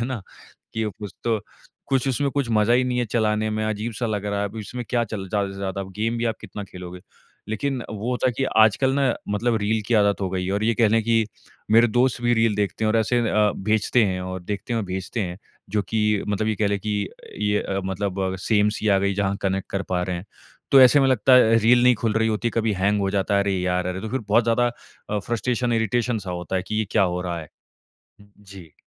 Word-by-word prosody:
है 115 - 0
ना 125 -6 -4 0.5
कि 110 0 -1
ओ 105 - -2
कुछ 105 -2 -6
तो 115 -2 +1 0.5
कुछ 135 -1 +1
उसमें 140 +2 0
कुछ 140 -4 -1
मज़ा 110 +1 +3
ही 125 +1 +4
नहीं 125 -1 -1
है 120 - +1
चलाने 110 -1 0
में 110 0 -1
अजीब 110 +2 -2
सा 120 +3 -2
लग 105 -2 -2
रहा 100 0 -1
है 100 - -1
अब 110 - -12
इसमें 120 +3 -6
क्या 120 -1 +1
चल 100 -3 -6
ज़्यादा 100 -1 0
से - - -10
ज़्यादा 100 0 -3 0.2
गेम 115 +2 0
भी 120 - -1
आप 115 - 0
कितना 105 - -7
खेलोगे। 90 -1 -9 0.5
लेकिन 130 +4 -2
वो 110 +3 -4
होता 125 +1 0
है - - -1
कि 135 - 0
आजकल 110 +5 +4
ना 140 - +1 0.3
मतलब 110 +3 0
रील 110 +2 +1
की 120 - +1
आदत 100 -2 +3
हो 95 - -1
गयी 90 -1 -2
है। 95 - -1
और 100 +2 0
ये 115 +1 +2
कह 115 -1 +3
ले 115 +2 +3
कि 115 0 +2 0.4
मेरे 115 +2 +6
दोस्त 120 +2 +1
भी 120 - +3
रील 115 -2 +2
देखते 105 +2 -1
हैं - - +2
और 110 - +2
ऐसे 120 +2 +1
अ, 105 -1 +3
भेजते 110 +3 +2
हैं 95 -2 -1
और 95 0 -5
देखते 105 +5 -4
हैं 115 - +1
और - - -3
भेजते 95 +5 -4
हैं, 90 -3 -3 0.3
जो 105 +1 +1
कि 105 -2 +1
मतलब 105 +1 0
ये 110 - +1
कह 105 - +3
ले 100 0 0
कि 105 -1 -2 0.3
ये 105 0 +1
अ, 95 0 -2
मतलब 95 0 -2
सेम 105 -2 +3
सी 110 - -1
आ 100 -1 +4
गयी 100 0 0
जहाँ 100 0 0
कनेक्ट 95 0 -1
कर 100 - -2
पा 90 - +1
रहे 90 0 -2
हैं। 90 - -7 0.5
तो 135 - +8
ऐसे 130 +3 +7
में 135 - +3
लगता 130 0 +3
है 115 -2 +6
रील 120 +2 +4
नहीं 125 0 +6
खुल 110 - +2
रही 110 0 +2
होती 110 +2 -1
कभी 115 -1 0
हैंग 105 +1 +2
हो 95 -1 0
जाता 100 0 0
है, 100 - +4
अरे 100 - 0
यार 90 0 0
अरे! 90 +1 -3
तो 110 - -5
फिर 130 +4 -2
बहुत 115 +3 +4
ज़्यादा 120 +1 +2 0.4
अ, 105 - 0
फ्रस्ट्रेशन 120 +3 -1
इरिटेशन 115 +1 0
सा 95 -2 -6
होता 90 +1 -3
है 95 - -1
कि 110 - -3
ये 110 - +1
क्या 105 - +3
हो 90 -1 0
रहा 85 -2 -3
है? 80 - -11 0.7
जी। 100 -5 -15
105 Hz, 255 wpm, -23 LUFS, 100-115 Hz, 0.7 s, तो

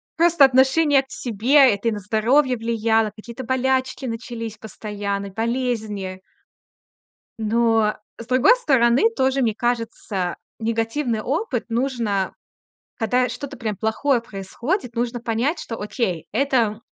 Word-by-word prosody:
Просто 340 -3 +5
отношение 270 +2 +4
к 265 - -28
себе. 250 +3 +4
Это 200 +3 -3
и - - -1
на 210 - -3
здоровье 245 +6 +2
влияло. 225 -1 +1
Какие-то 235 +3 -9
болячки 260 +1 0
начались 230 -2 -5
постоянно, 205 -2 -5
болезни. 220 -4 -2 1.2
Но, 225 -1 +2 0.2
с 230 - -7
другой 260 - +5
стороны, 265 - +3
тоже, 265 +1 +1
мне 225 -4 +2
кажется, 225 -6 -2 0.2
негативный 225 +2 -1
опыт 275 - -2
нужно 230 -6 -1 0.6
когда 250 +2 +1
что-то 255 +3 -6
прям 215 -4 -4
плохое 235 +5 +1
происходит, 235 - -4
нужно 240 0 -2
понять, 240 +8 0
что 230 -6 -6
окей- 190 - -2
это 235 -6 +1
235 Hz, 120 wpm, -22 LUFS, 220-260 Hz, 1.2 s, Просто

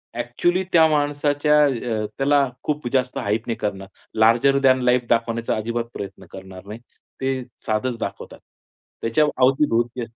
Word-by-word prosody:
Actually 125 +10 0
त्या 160 -1 +6
माणसाच्या 145 0 +1
अ, 120 -5 -2
त्याला 140 0 +3 0.2
खूप 150 -4 -2
जास्त 130 -1 0
हाइप 105 +3 -2
नाही 115 - -2
करणार. 95 -2 -4 0.3
लार्जर 120 +5 +4
दॅन 130 -1 +3
लाइफ 125 -1 +2
दाखवण्याचा 115 0 0
अजिबात 115 +2 -3
प्रयत्न 100 - -8
करणार 95 0 -11
नाही. 105 +3 -8 0.4
ते 130 -1 -1 0.2
साधंच 115 +3 -1
दाखवतात. - - -6 0.6
त्याच्या 115 +7 +2 0.2
अवती-भोवती 125 -3 +2
125 Hz, 135 wpm, -22 LUFS, 115-140 Hz, 0.6 s, त्या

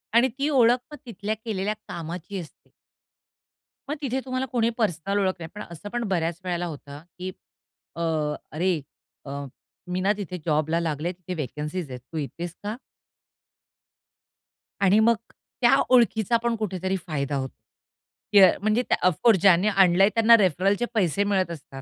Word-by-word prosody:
आणि 240 +2 +6
ती 285 +2 +1
ओळख 245 -4 +5
मग 295 - -8
तिथल्या 215 -2 -4
केलेल्या 210 -2 -1
कामाची 170 +3 -6
असते. 165 -4 -12 1.2
मग 295 - -1
तिथे 265 -2 -1
तुम्हाला 255 0 -2
कोणी 235 -2 +2
पर्सनल 200 -2 0
ओळख 190 -2 +1
नाही. 165 -1 -7
पण 210 - -6
असं 170 +5 -8
पण 240 +2 -2
बऱ्याच 170 -3 -1
वेळेला 175 -1 -1
होतं, 145 -3 -8 0.2
की 185 +1 -4 0.6
अ, 170 - -5 0.5
अरे 170 0 0 0.4
अ, 140 0 -5 0.4
मी 180 +1 -2
ना 195 +2 +3
तिथे 185 -3 -5
जॉबला 155 +1 +1
लागले 165 0 -2
तिथे 180 0 -8
व्हेकन्सीज 150 +1 -4
आहेत, 125 - -6
तू 165 - -5
येतेस 165 +3 -5
का? 210 +2 -3 2.1
आणि 195 +2 +5
मग 230 +1 +5 0.5
त्या 240 +2 +6
ओळखीचा 235 -3 +4
पण 235 -1 +1
कुठेतरी 190 -3 -2
फायदा 145 -3 -2
होतो. 130 -1 -3 0.8
की 205 - +8
अ, 190 -2 +9
म्हणजे 215 +4 +2 0.2
ऑफकोर्स 185 +4 +4
ज्यांनी 190 0 +5
आणलंय 195 -1 +5
त्यांना 230 0 +7
रेफरलचे 195 +3 +2
पैसे 200 -3 +2
मिळत 190 -3 +1
असतात. 140 -4 -9
185 Hz, 150 wpm, -25 LUFS, 165-220 Hz, 2.1 s, अ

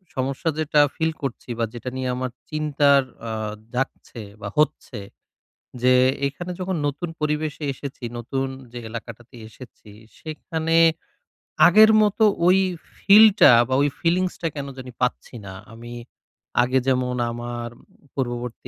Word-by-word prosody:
সমস্যা 135 +5 -2
যেটা 150 -1 +2 0.2
ফিল 160 0 0
করছি 130 -1 -5
বা 115 - +2
যেটা 120 +2 -6
নিয়ে 130 -1 -2
আমার 130 -1 -3 0.2
চিন্তার 145 -2 +3 0.3
আ - - -4 0.4
জাগছে 125 -2 -4 0.2
বা 100 - -5
হচ্ছে 150 -6 0 0.8
যে 125 0 +5 0.3
এখানে 175 +6 -8
যখন 185 -1 -2
নতুন 150 +4 -3
পরিবেশে 150 0 -2
এসেছি, 135 -2 -9
নতুন 135 +3 -3 0.3
যে 120 - -7
এলাকাটাতে 115 +1 -9
এসেছি, 110 -2 -15 0.3
সেখানে 160 +1 -3 0.9
আগের 220 +1 +7
মতো 210 +1 +2 0.2
ওই 185 +1 +6 0.4
ফিলটা 210 - +7 0.2
বা 130 - -2
ওই 145 - +2
ফিলিংসটা 175 0 0
কেন 140 -1 -5
জানি 130 -1 -8
পাচ্ছি 125 0 -2
না। 95 - -8 0.2
আমি 120 +1 -10 0.7
আগে 130 +2 +1
যেমন 125 -1 +1 0.2
আমার 120 0 -5 0.4
পূর্ববর্তী 120 -2 -4
135 Hz, 130 wpm, -23 LUFS, 125-155 Hz, 0.9 s, আগের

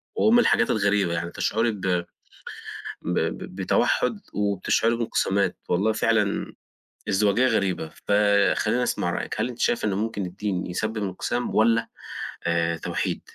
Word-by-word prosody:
وأم 235 +2 +5
الحاجات 115 - +3
الغريبة 100 -4 +2
يعني، 85 0 -3
تشعري 115 +5 0
ب 105 -3 -8
ب 90 -2 0 1.0
ب - - -1 0.2
بتوحّد 95 -2 +1
وبتشعري 105 +3 +1
بانقسامات، 100 -4 0
والله 100 +5 +2
فعلًا 110 -2 +1 0.6
ازدواجية 105 +5 +3
غريبة، 100 -9 0 0.2
فخليني 105 +3 +3
أسمع - - 0
رأيِِك. - - -3
هل - - +1
أنتِ 125 -1 -9
شايفة 120 - +1
إن 100 - 0
ممكن 105 -1 -2
الدين 95 +1 -3
يسبب 110 +5 -3
انقسام 105 +4 -2
والّا 115 +1 +3 0.6
آآ، 85 0 +1
توحيد؟ - - -2
105 Hz, 130 wpm, -25 LUFS, 95-115 Hz, 1.0 s, وأم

